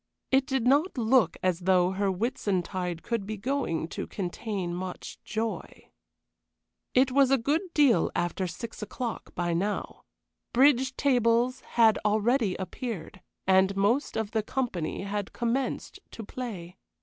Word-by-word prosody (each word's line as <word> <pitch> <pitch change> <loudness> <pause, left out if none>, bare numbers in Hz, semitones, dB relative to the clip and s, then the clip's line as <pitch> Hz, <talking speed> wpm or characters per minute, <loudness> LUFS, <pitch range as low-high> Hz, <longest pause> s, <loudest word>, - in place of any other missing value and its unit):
It 265 0 +3
did 265 -3 0
not 285 +6 +3
look 245 +1 +3
as 180 -2 +1
though 180 0 +3
her 195 +1 0
Whitsuntide 185 -5 -2
could 230 -4 -2
be 215 0 -4
going 205 - -1
to - - -5
contain 190 -1 -4
much 180 +1 -6
joy. 220 +1 -4 1.0
It 255 +1 +4
was 270 0 +4
a 270 - +5
good 285 +7 +1
deal 265 - +4
after 175 +2 -1
six 225 +8 -7
o'clock 230 +3 -5
by 175 -1 0
now. 200 +5 -2 0.5
Bridge 260 0 +4
tables 245 -2 +2 0.2
had 225 -2 +6
already 215 0 +2
appeared, 190 -1 -6 0.2
and 190 +1 +4
most 225 +9 +1
of 220 -1 -2
the 220 -2 +1
company 210 -9 -3
had 200 0 -4
commenced 245 +3 -2
to 225 - -8
play. 195 -7 -7
220 Hz, 135 wpm, -28 LUFS, 185-255 Hz, 1.0 s, had